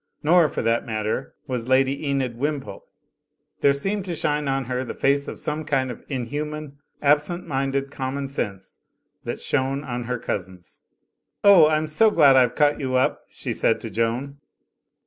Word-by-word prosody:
Nor, 165 Hz, 0 st, +5 dB
for -, -, -3 dB
that 115 Hz, +1 st, +1 dB
matter, 110 Hz, +3 st, -3 dB
was 125 Hz, -4 st, -3 dB
Lady 135 Hz, +2 st, +2 dB
Enid 135 Hz, -4 st, -1 dB
Wimpole; 140 Hz, +2 st, -4 dB, 0.8 s
there 140 Hz, -, +4 dB
seemed 195 Hz, +9 st, -1 dB
to 175 Hz, -3 st, -3 dB
shine 150 Hz, -1 st, -1 dB
on 135 Hz, -1 st, -1 dB
her 125 Hz, +1 st, -2 dB
face 140 Hz, +1 st, +1 dB
the -, -, -6 dB
same 150 Hz, +1 st, -3 dB
kind 135 Hz, -4 st, 0 dB
of 120 Hz, -, -10 dB
inhuman, 145 Hz, +2 st, -4 dB, 0.2 s
absent 150 Hz, +5 st, +2 dB
minded 135 Hz, -2 st, -2 dB
com 130 Hz, 0 st, -4 dB
mon 140 Hz, -1 st, -3 dB
sense 100 Hz, -8 st, -5 dB, 0.5 s
that -, -, -4 dB
shone 135 Hz, +2 st, -1 dB
on 120 Hz, -3 st, -4 dB
her 125 Hz, +1 st, -2 dB
cousin's. 95 Hz, -6 st, -6 dB, 0.6 s
"Oh, 195 Hz, -6 st, +8 dB
I'm 155 Hz, 0 st, +1 dB
so 155 Hz, +9 st, +4 dB
glad 145 Hz, -9 st, +5 dB
I've 125 Hz, -2 st, +4 dB
caught 145 Hz, -1 st, +3 dB
you 130 Hz, -2 st, -2 dB
up," 130 Hz, -, 0 dB
she -, -, -5 dB
said 115 Hz, -, +1 dB
to 115 Hz, -, -6 dB
Joan. 120 Hz, +6 st, -2 dB
135 Hz, 165 wpm, -23 LUFS, 125-150 Hz, 0.8 s, Oh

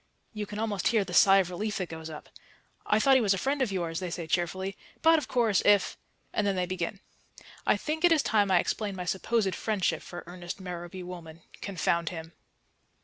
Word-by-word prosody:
You 210 Hz, -1 st, -4 dB
can 210 Hz, -, -7 dB
almost 210 Hz, -4 st, -1 dB
hear 220 Hz, -3 st, +3 dB
the 180 Hz, -2 st, -8 dB
sigh 195 Hz, 0 st, +7 dB
of 185 Hz, -2 st, +2 dB
relief 210 Hz, +3 st, -2 dB
that 185 Hz, -4 st, -3 dB
goes 160 Hz, 0 st, -7 dB
up. 155 Hz, -1 st, -9 dB, 0.6 s
"I 210 Hz, -, +4 dB
thought 270 Hz, +5 st, +5 dB
he 260 Hz, -, +6 dB
was 200 Hz, -3 st, +3 dB
a -, -, -3 dB
friend 275 Hz, +6 st, 0 dB
of 245 Hz, -6 st, +1 dB
yours," 170 Hz, -3 st, -2 dB
they 180 Hz, -2 st, -4 dB
say 170 Hz, 0 st, -4 dB
cheerfully. 185 Hz, +4 st, -1 dB, 0.3 s
"But, 325 Hz, 0 st, +6 dB
of 275 Hz, -, -7 dB
course, 225 Hz, -6 st, +2 dB
if 205 Hz, -2 st, +4 dB, 0.2 s
" -, -, -41 dB
and 210 Hz, -, +1 dB
then 200 Hz, -, +1 dB
they 180 Hz, -1 st, 0 dB
begin. 185 Hz, +2 st, -4 dB, 0.7 s
I -, -, +4 dB
think 315 Hz, +2 st, -3 dB
it 350 Hz, -, +6 dB
is 315 Hz, -3 st, +4 dB
time 205 Hz, -2 st, +2 dB
I 185 Hz, -, +5 dB
explained 200 Hz, +2 st, -1 dB
my 180 Hz, -, -4 dB
supposed 195 Hz, +2 st, 0 dB
friendship 190 Hz, -7 st, 0 dB
for 175 Hz, -, -8 dB
Ernest 175 Hz, +1 st, -7 dB
Merrowby 180 Hz, 0 st, -6 dB
Woolman 170 Hz, -2 st, -9 dB, 0.2 s
confound 170 Hz, -3 st, 0 dB
him. 165 Hz, -1 st, -8 dB
190 Hz, 215 wpm, -29 LUFS, 175-215 Hz, 0.7 s, sigh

